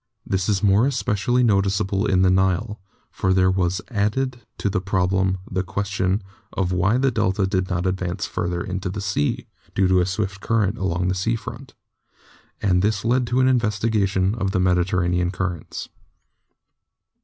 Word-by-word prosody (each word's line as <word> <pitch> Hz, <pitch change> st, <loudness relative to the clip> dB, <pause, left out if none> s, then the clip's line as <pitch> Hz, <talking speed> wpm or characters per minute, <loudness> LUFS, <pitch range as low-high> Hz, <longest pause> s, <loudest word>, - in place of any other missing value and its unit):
This 95 Hz, 0 st, -1 dB
is 100 Hz, -1 st, +1 dB
more 105 Hz, +5 st, +4 dB
especially 125 Hz, -2 st, +1 dB
noticeable 100 Hz, -2 st, +1 dB
in 95 Hz, 0 st, +3 dB
the 95 Hz, -, +4 dB
Nile, 95 Hz, +3 st, +1 dB, 0.3 s
for 95 Hz, 0 st, 0 dB
there 95 Hz, 0 st, +4 dB
was 95 Hz, +1 st, 0 dB
added 120 Hz, +4 st, -1 dB, 0.2 s
to -, -, -2 dB
the 95 Hz, -1 st, 0 dB
problem 95 Hz, 0 st, +1 dB
the 95 Hz, -, -1 dB
question 95 Hz, +1 st, -1 dB, 0.3 s
of 90 Hz, -2 st, -1 dB
why 95 Hz, +6 st, +2 dB
the 135 Hz, 0 st, +2 dB
delta 100 Hz, -3 st, +1 dB
did 95 Hz, -1 st, -1 dB
not 90 Hz, -1 st, -1 dB
advance 95 Hz, 0 st, -2 dB
further 85 Hz, 0 st, -2 dB
into 95 Hz, 0 st, -3 dB
the 100 Hz, +3 st, -5 dB
sea 95 Hz, -7 st, -1 dB, 0.3 s
(due 95 Hz, -1 st, +3 dB
to 90 Hz, 0 st, +4 dB
a 90 Hz, -, 0 dB
swift 100 Hz, +1 st, -3 dB
current 115 Hz, -1 st, 0 dB
along 90 Hz, -1 st, 0 dB
the -, -, +1 dB
sea 95 Hz, +5 st, 0 dB
front), 120 Hz, +3 st, -8 dB, 0.9 s
and 90 Hz, -3 st, +3 dB
this 105 Hz, +1 st, 0 dB
led 125 Hz, +1 st, +2 dB
to 125 Hz, +2 st, +2 dB
an 130 Hz, -, +4 dB
investigation 105 Hz, -5 st, +1 dB
of 105 Hz, -4 st, -1 dB
the 95 Hz, -, 0 dB
Mediterranean 90 Hz, -1 st, +1 dB
currents. 90 Hz, -3 st, -4 dB
95 Hz, 165 wpm, -22 LUFS, 95-105 Hz, 0.9 s, more